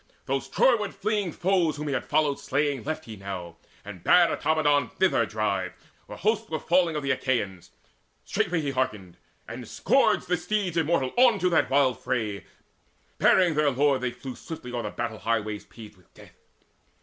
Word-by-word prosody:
Those - - -2
Troyward - - +2
fleeing 210 -4 -1
foes 175 -2 +1
Whom 150 0 -5
he 140 - -1
had - - -3
followed 150 -2 +1
slaying, 145 -2 -1
left 155 +1 -4
he 110 - -8
now, 95 -4 -7 0.3
And 100 -4 -9
bade 175 -1 +6
Automedon 145 -4 +1
thither 150 - +2
drive, 100 -3 -2 0.3
where - - -9
hosts 220 +1 0
Were 160 - -2
falling 170 0 +2
of 150 - -2
the 140 - 0
Achaeans. 115 -9 -2 0.6
Straightway 170 -2 0
he 145 -2 -2
Hearkened, 105 -9 -3 0.3
and - - -8
scourged - - +2
the 180 +1 +1
steeds 190 -1 -2
immortal 160 -5 +1
on 245 -3 +6
To 180 -1 +1
that 165 - +2
wild 135 -3 +2
fray: 105 -5 -3 0.7
bearing 180 -3 +4
their 150 -1 +2
lord 135 0 +2
they 125 - 0
flew 130 +1 -8
Swiftly 150 -7 -8
o'er 120 -1 -3
battle 115 -2 -4
highways 110 -2 -2
paved 110 -3 -13
with 90 - -26
death. - - -16
140 Hz, 175 wpm, -26 LUFS, 115-170 Hz, 0.7 s, bade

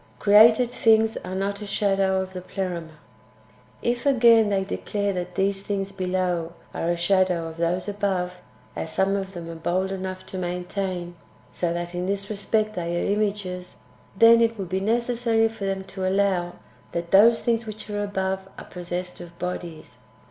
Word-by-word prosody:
— - - -31
Created 220 +4 +6
tilings 225 -2 +3
are 185 +1 -5
not 200 +2 -2
a 210 - -6
shadow 195 -2 +1
of 190 0 -10
the 180 - -5
Pleroma. 180 -3 -4 0.9
1. - - -25
If, 240 +2 -1
again, 230 -5 +6
they 195 -1 +1
declare 200 +1 -2
that 180 -1 -5
these 195 0 0
things 195 -1 -3
[below] 180 -3 -1 0.2
are 165 - -2
a 175 - +1
shadow 180 -1 +2
of 160 0 -9
those 175 +3 0
[above], 195 -3 -1 0.4
as 160 - -4
some 195 +4 +1
of 195 -1 -4
them 170 -1 -6
are 165 - -6
bold 180 +4 -1
enough 185 -1 -5
to 185 - -6
maintain, 180 0 -3 0.3
so 175 -2 -1
that 175 0 -4
in 180 +1 -2
this 200 +1 -2
respect 215 +1 0
they 175 -2 -2
are 200 - +1
images, 200 -4 -2 0.4
then 230 +2 +7
it 230 0 +2
will 195 - -3
be 185 +2 -2
necessary 230 +1 +1
for 220 -3 -6
them 195 0 -2
to 190 -1 -3
allow 190 -3 +1 0.4
that 170 0 -3
those 225 +4 +6
things 230 -1 0
which 215 0 -7
are 205 -1 -2
above 190 -1 -2
are - - -9
possessed 180 0 -6
of 170 -1 -11
bodies. 175 -3 -6
190 Hz, 180 wpm, -24 LUFS, 180-205 Hz, 0.9 s, then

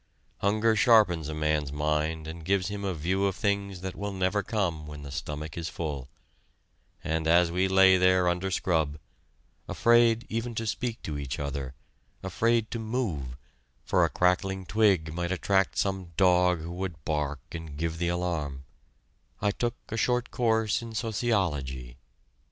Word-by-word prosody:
Hunger 110 +2 +2
sharpens 100 - +4
a - - -3
man's 75 -2 0
mind 75 +2 -1
and 80 +1 -7
gives 95 +1 +1
him 100 0 -5
a 95 -2 -1
view 95 +6 0
of 95 - -2
things 100 -3 -1
that 95 0 -5
will 100 0 -4
never 95 +2 +1
come 90 -8 -2
when 75 -1 -8
the 70 - -8
stomach 75 +2 -5
is 85 0 -4
full; 70 -5 -5 0.9
and 80 0 -1
as 85 +1 +4
we 90 +2 +1
lay 95 0 +6
there 90 0 +4
under 90 +2 0
scrub, 80 -5 0 0.7
afraid 120 -1 +4
even 115 +1 -3
to 115 - -2
speak 115 +1 -3
to 75 -2 -4
each 65 -3 -4
other, 70 -2 -4 0.5
afraid 115 -1 +1
to 115 - -3
move, 100 - -3 0.5
for - - +3
a - - +3
crackling 95 +1 +1
twig 95 -7 +2
might 85 +1 -2
attract 95 +1 +1
some 95 -3 -1
dog 90 -2 +4
who 85 +2 -6
would 90 -4 -5
bark 75 -2 -1
and 80 -3 -7
give 80 +1 -2
the 85 - 0
alarm, 80 -6 -2 0.7
I 105 - +1
took 120 +2 -2
a 110 - -3
short 125 +1 +1
course 110 -3 +1
in 115 -1 -8
sociology.... 80 - -1
90 Hz, 160 wpm, -28 LUFS, 80-100 Hz, 0.9 s, lay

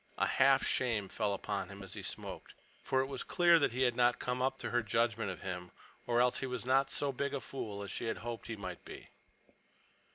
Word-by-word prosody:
A - - +3
half 135 0 +4
shame 110 -6 +1
fell 105 -2 0
upon 100 -1 -3
him 100 0 -9
as 95 - -7
he - - -6
smoked. - - -6 0.3
For 130 - +1
it - - 0
was 135 -1 -5
clear 175 -2 +5
he 130 -3 +2
had 120 -2 +3
not 120 0 +4
come 125 0 -2
up 130 +1 +1
to - - -4
her 120 - +3
judgment 115 -1 +1
of 90 - -6
him, 90 -1 -4 0.4
or 120 0 +3
else 125 0 +3
he 135 - -2
was 125 -1 -4
not 135 +1 +3
so 145 -1 0
big 140 +2 -2
a - - -1
fool 105 -7 -5
as 100 - -6
she - - -4
had 115 - -1
hoped 120 0 -6
he 115 - -3
might 95 -4 -7
be. - - -10
120 Hz, 230 wpm, -34 LUFS, 105-130 Hz, 0.4 s, clear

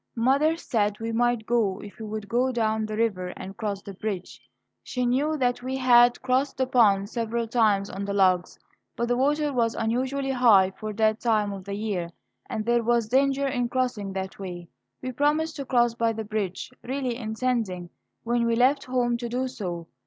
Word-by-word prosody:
Mother 280 +7 +3
said 210 -8 -1
we 225 0 -3
might 240 -1 +1
go 215 -5 +1
if 205 +2 -11
we 220 - -6
would 215 -1 -5
go 245 +5 +1
down 220 -2 0
the 215 0 -4
river 205 -5 0
and 195 +1 -8
cross 200 -3 -4
the 200 - -8
bridge. 195 -2 -5 0.4
She 250 -1 -2
knew 285 +6 +1
that 245 -2 0
we 260 +1 -3
had 245 -1 +5
crossed 260 +2 +1
the 260 - +1
pond 210 -6 +3
several 230 +1 -2
times 215 -4 +2
on 200 0 -5
the 200 - -3
logs, 185 -3 +2 0.4
but 235 - -1
the 245 - +3
water 290 +3 +1
was 230 -2 +1
unusually 260 +4 -1
high 220 -7 +5
for 215 +3 -6
that 220 +1 +2
time 215 -4 +1
of 190 -2 -8
the 200 0 -4
year, 200 -5 -2 0.4
and 215 - -3
there 240 0 +3
was 235 -1 +1
danger 275 +2 +2
in 245 -3 -1
crossing 245 -6 -1
that 190 0 -5
way. 175 -3 -7 0.3
We 255 - -3
promised 305 +4 0
to 275 - -4
cross 240 -2 +2
by 230 -1 0
the 220 0 -4
bridge, 205 -1 -3
really 255 -1 -2
intending 220 -6 -2 0.3
when 235 0 +1
we 230 - +2
left 260 +4 +3
home 245 -2 0
to 235 0 -5
do 255 +2 -1
so. 175 -8 -5
230 Hz, 195 wpm, -26 LUFS, 205-255 Hz, 0.4 s, had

